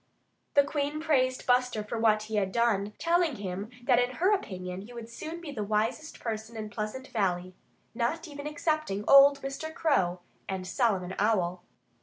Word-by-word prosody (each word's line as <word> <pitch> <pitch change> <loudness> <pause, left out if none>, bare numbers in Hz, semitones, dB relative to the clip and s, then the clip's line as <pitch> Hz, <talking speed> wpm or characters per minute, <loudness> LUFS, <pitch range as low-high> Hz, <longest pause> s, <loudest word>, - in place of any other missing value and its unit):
The 285 - +7
Queen 290 +1 -2
praised 260 -5 +1
Buster 250 -3 +2
for 225 +2 -4
what 215 -1 +3
he 215 0 -3
had 195 -2 +1
done, 210 -2 +1
telling 335 -3 +2
him 200 0 -5
that 245 -1 +4
in 250 +1 0
her 370 +8 +3
opinion 185 - -4
he 225 +5 -11
would 235 -1 -7
soon 315 +8 -7
be 335 -4 -7
the 220 -7 -3
wisest 220 +9 -1
person 225 0 -5
in 215 -1 -5
Pleasant 215 +6 -5
Valley 185 -4 -1 0.4
not 250 +9 -1
even 290 -1 -7
excepting 300 -9 -1
old 275 0 +8
Mr. 275 +4 -4
Crow 185 - +1 0.3
and 190 -1 -3
Solomon 190 -4 0
Owl. 185 -4 +1
235 Hz, 170 wpm, -29 LUFS, 205-285 Hz, 0.4 s, old